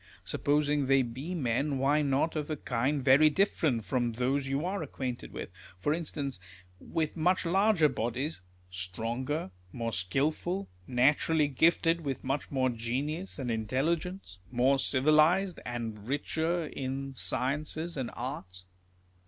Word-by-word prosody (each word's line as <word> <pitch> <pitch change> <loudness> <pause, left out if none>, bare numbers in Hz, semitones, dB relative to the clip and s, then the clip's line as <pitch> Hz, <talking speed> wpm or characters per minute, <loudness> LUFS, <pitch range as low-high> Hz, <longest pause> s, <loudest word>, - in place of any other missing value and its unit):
Supposing 145 -1 +1
they 135 0 +5
be 130 +9 -5
men, 140 0 0
why 140 +3 +3
not 145 +3 +1
of 150 -1 -2
a 155 - -2
kind 130 +3 -1
very 140 +3 +7
different 150 - +1
from 120 -2 0
those 135 +4 0
you 135 +4 -1
are 195 +1 -2
acquainted 130 -4 -5
with; - - -6 0.3
for 145 +11 0
instance, 145 - -3 0.4
with 155 -2 -2
much 180 +3 +2
larger 190 -1 +4
bodies, 130 +2 -2 0.3
stronger, 115 - -3 0.2
more 115 -2 -3
skilful, 155 - -1 0.2
naturally 145 +4 +3
gifted 165 +4 +3
with, 140 -4 -4
much 135 +2 -2
more 130 -2 +1
genius 135 +10 -3
and 130 -4 -2
intelligence, 135 - -2
more 130 +2 +3
civilised, 155 +8 +4
and 115 -3 -5
richer 160 +4 0
in 135 -1 -4
sciences 150 +7 -1
and 130 -4 -3
arts 90 -8 -6
140 Hz, 130 wpm, -30 LUFS, 125-155 Hz, 0.4 s, very